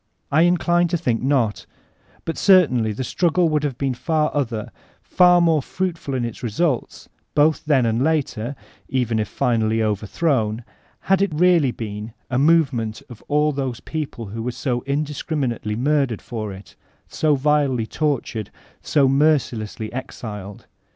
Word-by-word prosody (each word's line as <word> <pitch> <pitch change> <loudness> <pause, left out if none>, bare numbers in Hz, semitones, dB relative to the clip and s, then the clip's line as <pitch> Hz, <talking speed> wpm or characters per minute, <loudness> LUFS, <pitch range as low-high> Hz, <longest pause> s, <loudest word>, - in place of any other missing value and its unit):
I 155 +3 +4
incline 175 0 +3
to« 175 +1 0
think 125 -9 -1
not 130 -6 0 0.6
But 165 - -2
certainly 140 - +4
the 110 +5 -4
struggle 175 +4 +1
would 150 -1 0
have 140 -4 -2
been 135 -2 -1
far 155 +4 0
other, 115 -7 -2 0.3
far 180 -1 +5
more 165 -3 +3
fruitful 165 -3 -3
in 125 -2 -1
its 115 - -7
results, 125 +3 -2 0.3
both 150 +1 +3
then 140 -5 +3
and 115 +2 +1
later, 140 -5 -1 0.3
(even 120 -3 0
if 105 - -1
finally 110 0 +1
overthrown), 110 - 0 0.4
had 195 0 +2
it 200 - +2
really 170 -2 +4
been 110 -1 -6 0.2
a 125 - +1
movement 140 -8 +2
of 115 - -11
all 150 +1 +2
those 135 -4 -3
people 150 -7 -5
who 110 +3 -6
were 125 +2 -2
so 125 -2 -2
indiscriminate 145 -4 -2
ly 105 - -1
murdered 135 -2 0
for 110 -4 -5
it, 95 +1 -12 0.3
so 155 -2 +1
vilely 140 -4 +1
tortured, 130 -6 -2 0.3
so 140 -3 +2
mercilessly 130 -7 +1
exiled. 105 -6 -7
135 Hz, 150 wpm, -21 LUFS, 115-155 Hz, 0.6 s, far